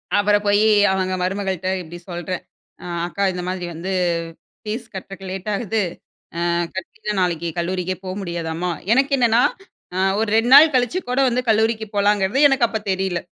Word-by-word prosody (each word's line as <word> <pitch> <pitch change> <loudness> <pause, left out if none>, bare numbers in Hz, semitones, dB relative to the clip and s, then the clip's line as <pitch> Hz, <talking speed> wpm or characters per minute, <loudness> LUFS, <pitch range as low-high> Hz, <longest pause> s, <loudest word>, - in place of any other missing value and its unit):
அப்பறம் 205 0 +3
போய், 205 +1 +4 0.3
அவங்க 185 -1 0
மருமகள்ட்ட 190 -1 -2
இப்டி 175 +1 -9
சொல்றேன், 175 +1 -4 0.4
அ - - -9 0.2
அக்கா 200 +3 -3
இந்த 180 0 -4
மாதிரி 185 -1 -3
வந்து, 185 +4 -4 0.7
ஃபீஸ் 220 +2 -4
கட்டுறக்கு 195 0 -8
லேட் 190 +2 -5
ஆகுது. 215 +1 -1 0.7
அ - - +1 0.3
கட்டிட்டா 210 +3 -5
நாளைக்கு 170 -2 0
கல்லூரிக்கே 180 +1 -2
போ 185 - -4
முடியாதாம்மா. 170 0 -3 0.2
எனக்கென்னன்னா, 250 -3 +3 0.5
அ 185 - -2 0.2
ஒரு 225 - 0
2 230 +2 +2
நாள் 310 0 +9
கழிச்சு 255 +8 +2
கூட 250 - 0
வந்து 245 +1 +1
கல்லூரிக்கு 220 0 +2
போலாங்கிறது 205 +2 +2
எனக்கு 270 -3 +3
அப்ப 220 -2 -3
தெரில. 190 -2 -1
195 Hz, 155 wpm, -21 LUFS, 180-220 Hz, 0.7 s, நாள்